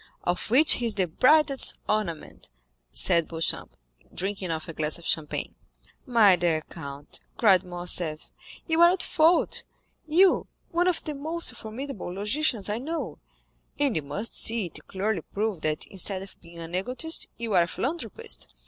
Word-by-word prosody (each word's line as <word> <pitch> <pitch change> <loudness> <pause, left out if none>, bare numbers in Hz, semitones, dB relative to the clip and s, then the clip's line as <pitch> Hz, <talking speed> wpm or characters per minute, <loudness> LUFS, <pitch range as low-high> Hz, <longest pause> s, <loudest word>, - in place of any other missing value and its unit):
"Of 175 +3 -1
which 285 +7 +5
he 240 - -1
is 220 - 0
the 190 -2 +2
brightest 275 - +4
ornament," 200 -7 -3 0.4
said 170 - +2
Beauchamp, 165 0 -3 0.3
drinking 195 0 -4
off 160 -1 -3
a 165 - -6
glass 155 0 0
of 170 - -13
champagne. 150 -2 -1 0.5
"My 220 -6 +6
dear 170 -3 +1
count," 140 -3 -6 0.2
cried 195 -5 +5
Morcerf, 175 -3 -4 0.3
"you 325 0 +2
are 345 - +9
at 375 - 0
fault—you, 330 +1 +2 0.2
one 350 +1 +2
of 360 - +1
the 305 - -4
most 315 +2 0
formidable 230 -2 -6
logicians 210 +3 0
I 210 +2 -1
know—and 290 -2 -5
you 160 - +1
must 150 +11 -4
see 225 -3 0
it 155 -2 -8
clearly 195 -1 -1
proved 205 -1 -3
that 155 -1 0
instead 190 0 0
of 195 - -13
being 170 0 -14
an 165 0 -8
egotist, 250 - -2
you 230 -2 -3
are 180 - +6
a 170 - +1
philanthropist. 340 - -3
205 Hz, 155 wpm, -27 LUFS, 170-275 Hz, 0.5 s, are